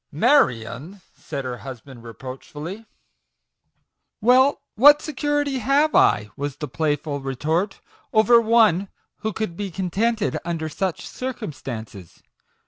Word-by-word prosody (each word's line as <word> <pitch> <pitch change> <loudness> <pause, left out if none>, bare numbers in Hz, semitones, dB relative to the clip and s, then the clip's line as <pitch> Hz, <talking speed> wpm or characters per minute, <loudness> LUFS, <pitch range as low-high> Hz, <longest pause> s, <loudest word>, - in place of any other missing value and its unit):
" - - -57 0.2
Marion! 130 - +1
" - - -38 0.2
said 140 -3 -3
her 125 -1 -4
husband 130 -1 -10
reproachfully. 135 - -8
t( 225 - -19 1.3
Well, 255 +4 +4
what 290 +6 +7
security 290 -2 -1
have 280 +5 +2
I," 105 0 +3
was 145 -1 -4
the 150 - -5
play 150 +2 0
ful 145 0 -5
retort, 155 +9 -2 0.2
" - - -35
over 225 +2 +5
one 220 -5 +4 0.3
who 220 - -3
could 215 -6 -4
be 200 +1 -4
contented 200 +5 -1
under 165 -2 -3
such 180 +1 -3
circumstances 130 - -7
175 Hz, 135 wpm, -23 LUFS, -, 1.3 s, what